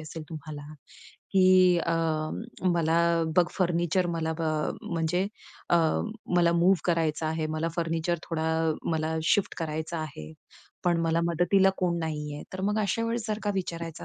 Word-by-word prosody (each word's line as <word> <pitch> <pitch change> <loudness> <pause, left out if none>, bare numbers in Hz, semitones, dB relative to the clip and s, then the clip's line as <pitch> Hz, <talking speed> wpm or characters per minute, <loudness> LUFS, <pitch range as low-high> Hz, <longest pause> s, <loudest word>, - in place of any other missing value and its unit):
असेल 155 +1 -7
तुम्हाला, 155 -2 -7 0.7
की 185 -2 +6
अ, 170 - -1 0.8
मला 165 0 +2 0.4
बघ 180 - +6
फर्निचर 175 0 +1
मला 160 -1 -1
अ, 155 -2 -1
म्हणजे 170 +1 0 0.5
अ, 175 - +6 0.6
मला 170 -1 +4
मूव्ह 175 +2 +4
करायचा 165 -2 +1
आहे. 160 0 -1
मला 155 +1 -2
फर्निचर 165 0 0
थोडा 160 -1 -1 0.5
मला 160 0 -1 0.2
शिफ्ट 205 - +1
करायचा 160 0 -3
आहे, 80 - -7 0.5
पण 175 -1 +2
मला 165 0 +2
मदतीला 185 +3 +3
कोण 175 -2 +1
नाहीये. 150 -2 -4
तर 190 - -4
मग 210 - 0
अशा 215 +3 0
वेळेस 230 0 -2
जर 215 -1 -1
का 205 - +1
विचारायचं 170 -3 -4
165 Hz, 145 wpm, -27 LUFS, 160-180 Hz, 0.8 s, की